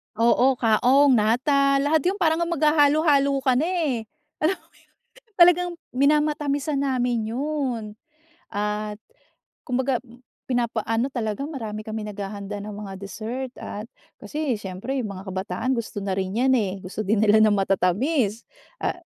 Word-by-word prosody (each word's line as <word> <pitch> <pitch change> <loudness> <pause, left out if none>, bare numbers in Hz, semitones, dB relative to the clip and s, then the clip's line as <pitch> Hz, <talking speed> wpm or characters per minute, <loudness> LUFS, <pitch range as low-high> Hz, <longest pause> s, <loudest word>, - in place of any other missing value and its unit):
Oo. 240 +4 +4
Kaong, 250 +5 +4
nata, 275 +6 +3
lahat 310 +2 +3
yung 380 - +1
parang 320 -1 +3
ang 340 - 0
maghahalo-halo 295 -2 +4
ka 260 -2 +3
na 315 - +1
eh. 335 -8 0 0.4
Alam 325 +5 +2
mo, - - -28 0.7
talagang 355 0 +6 0.2
minamatamisan 290 0 +1
namin 245 -5 0
yun. 270 -2 -2 0.7
At, 210 0 -3 0.7
kumbaga 255 -1 0 0.5
pinapa-ano 235 -1 0
talaga, 230 +2 -2
marami 220 -8 -6
kaming 215 -1 -4
naghahanda 200 0 -6
ng 205 +1 -7
mga 205 -1 -7
dessert 230 +6 -5
at 210 +2 -7 0.3
kasi 295 -7 -2
siyempre 205 +7 -4
yung 215 -6 -3
mga 190 +1 -8
kabataan 190 +5 -3
gusto 220 -2 -5
na 195 - -3
rin 190 +1 -2
'yan 265 - +3
eh. 200 -4 -1
Gusto 195 +2 -5
din 215 +1 +2
nila 215 0 +5
ng 215 -1 +5
matatamis. 205 - +1 0.4
Ah - - -1
240 Hz, 140 wpm, -24 LUFS, 210-285 Hz, 0.7 s, talagang